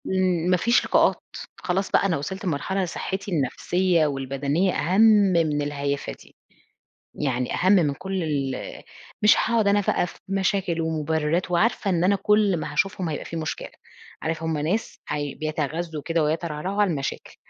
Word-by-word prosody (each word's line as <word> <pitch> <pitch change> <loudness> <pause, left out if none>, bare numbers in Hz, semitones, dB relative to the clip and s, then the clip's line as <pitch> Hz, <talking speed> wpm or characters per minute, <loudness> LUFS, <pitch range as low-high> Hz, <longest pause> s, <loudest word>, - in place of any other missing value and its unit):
امم 185 -2 +1
ما 180 - +4
فيش 235 +7 +2
لقاءات، - - +2 0.3
خلاص 190 +2 -2
بقى - - +3
أنا 180 -4 +1
وصلت 190 +8 -5
لمرحلة 185 +4 -1
صحتي 190 +3 -4
النفسيّة 170 +3 +1
والبدنية 140 +6 -1
أهم 180 +8 +1
من 185 -9 +4
الهيافة 140 -1 -3
دي. - - -18 0.8
يعني 125 -3 -1
أهم 185 +2 +3
من 160 -8 +3
كل 190 +3 -4
ال 140 -4 -3 0.4
مش 210 0 +6
هاقعد 225 -2 +2
أنا 205 +1 +4
بقى 185 - +1
في - - -13
مشاكل 190 -3 0
ومبررات، 160 +2 -1
وعارفة 200 +3 +1
إن 175 -2 +1
أنا 195 +2 +4
كل 205 -1 +2
ما 150 - -5
هاشوفهم 185 +2 0
هيبقى 150 - -4
في - - -7
مشكلة. 160 -1 -4 0.5
عارف 160 0 -3
همّ 160 -1 -1
ناس 170 +10 -2
هي 145 -2 -3
بيتغزوا 155 +1 -3
كده 165 -1 +1
ويترعرعوا 165 +5 -1
على 205 - +3
المشاكل، 140 -3 -4
170 Hz, 160 wpm, -24 LUFS, 150-190 Hz, 0.8 s, مش